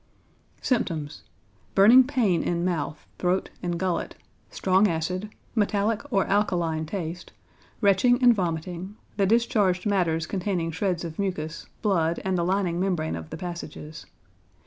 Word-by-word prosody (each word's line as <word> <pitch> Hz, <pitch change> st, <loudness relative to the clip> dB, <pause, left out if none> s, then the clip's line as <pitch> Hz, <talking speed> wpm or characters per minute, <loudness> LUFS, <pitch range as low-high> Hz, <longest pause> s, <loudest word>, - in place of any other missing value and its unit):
Symptoms. 160 Hz, -, -1 dB, 0.5 s
Burning 225 Hz, +7 st, +8 dB
pain 240 Hz, -, +1 dB
in 170 Hz, 0 st, -1 dB
mouth, 165 Hz, -4 st, -2 dB
throat, 180 Hz, +1 st, 0 dB
and 175 Hz, -1 st, -2 dB
gullet, 185 Hz, -1 st, -2 dB, 0.3 s
strong 190 Hz, +2 st, +3 dB
acid, 180 Hz, +4 st, -2 dB, 0.2 s
metallic 210 Hz, 0 st, +1 dB
or 195 Hz, -4 st, +2 dB
alkaline 175 Hz, -6 st, 0 dB
taste; 175 Hz, -1 st, -5 dB, 0.5 s
retching 215 Hz, +5 st, +4 dB
and 245 Hz, -1 st, +8 dB
vomiting, 180 Hz, 0 st, -3 dB, 0.2 s
the 195 Hz, -2 st, +3 dB
discharged 210 Hz, -4 st, +2 dB
matters 175 Hz, -6 st, +1 dB
containing 180 Hz, -3 st, -2 dB
shreds 180 Hz, +1 st, -1 dB
of 165 Hz, 0 st, -7 dB
mucus, 165 Hz, -5 st, -3 dB, 0.2 s
blood, 170 Hz, -5 st, +1 dB
and 190 Hz, -1 st, +1 dB
the 170 Hz, -, +1 dB
lining 180 Hz, -1 st, 0 dB
membrane 180 Hz, -4 st, 0 dB
of 80 Hz, -1 st, -7 dB
the -, -, -6 dB
passages. 165 Hz, -3 st, -7 dB
180 Hz, 130 wpm, -26 LUFS, 165-200 Hz, 0.5 s, Burning